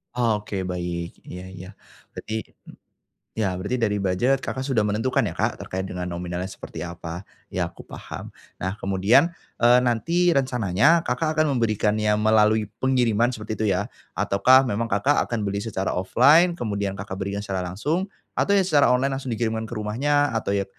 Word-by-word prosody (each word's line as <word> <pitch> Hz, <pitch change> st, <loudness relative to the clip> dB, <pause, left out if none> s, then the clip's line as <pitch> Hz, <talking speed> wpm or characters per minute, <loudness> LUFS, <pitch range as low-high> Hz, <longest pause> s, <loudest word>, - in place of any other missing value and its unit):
Oke, 105 Hz, -5 st, -1 dB
baik, 85 Hz, -2 st, -4 dB
iya 90 Hz, +1 st, -8 dB
iya. 90 Hz, 0 st, -10 dB, 0.5 s
Berarti 110 Hz, -, -5 dB, 1.0 s
ya 95 Hz, -4 st, -1 dB
berarti 105 Hz, +7 st, -3 dB
dari 105 Hz, -2 st, +1 dB
budget 100 Hz, +8 st, +1 dB
Kakak 130 Hz, -, -3 dB
sudah 130 Hz, -5 st, +1 dB
menentukan 110 Hz, +5 st, +1 dB
ya -, -, -2 dB
Kak -, -, -1 dB
terkait 95 Hz, +1 st, -5 dB
dengan 90 Hz, 0 st, -4 dB
nominalnya 90 Hz, +1 st, -4 dB
seperti -, -, -8 dB
apa. 85 Hz, +1 st, -7 dB, 0.2 s
Ya, -, -, -1 dB
aku -, -, -16 dB
paham. -, -, -8 dB, 0.3 s
Nah 95 Hz, +2 st, -2 dB
kemudian, 105 Hz, -, +3 dB, 0.2 s
eee, 120 Hz, +1 st, +5 dB
nanti 170 Hz, +9 st, +1 dB
rencananya 125 Hz, -, +3 dB
Kakak 155 Hz, +5 st, 0 dB
akan 145 Hz, -4 st, +2 dB
memberikannya 110 Hz, -2 st, +1 dB
melalui 110 Hz, -1 st, +3 dB
pengiriman 120 Hz, -3 st, +2 dB
seperti 110 Hz, -2 st, -6 dB
itu 110 Hz, -, -1 dB
ya, 100 Hz, +4 st, -1 dB, 0.2 s
ataukah 130 Hz, +6 st, +4 dB
memang 115 Hz, +2 st, -1 dB
Kakak 135 Hz, +9 st, +2 dB
akan 120 Hz, -2 st, -3 dB
beli 100 Hz, +2 st, -3 dB
secara 95 Hz, -5 st, -2 dB
offline 150 Hz, -, +5 dB
kemudian 100 Hz, -, -2 dB
Kakak 100 Hz, 0 st, -6 dB
berikan 100 Hz, +1 st, -3 dB
secara 95 Hz, -3 st, -3 dB
langsung, 145 Hz, -, -1 dB, 0.3 s
atau 200 Hz, -, +2 dB
ya 200 Hz, -, +5 dB
secara 150 Hz, -8 st, +4 dB
online 135 Hz, +2 st, +1 dB
langsung 135 Hz, -2 st, -5 dB
dikirimkan 110 Hz, 0 st, -1 dB
ke 110 Hz, -, -10 dB
rumahnya, 130 Hz, +5 st, 0 dB
atau 100 Hz, -2 st, -1 dB
ya 100 Hz, -1 st, +1 dB
110 Hz, 165 wpm, -24 LUFS, 95-130 Hz, 1.0 s, eee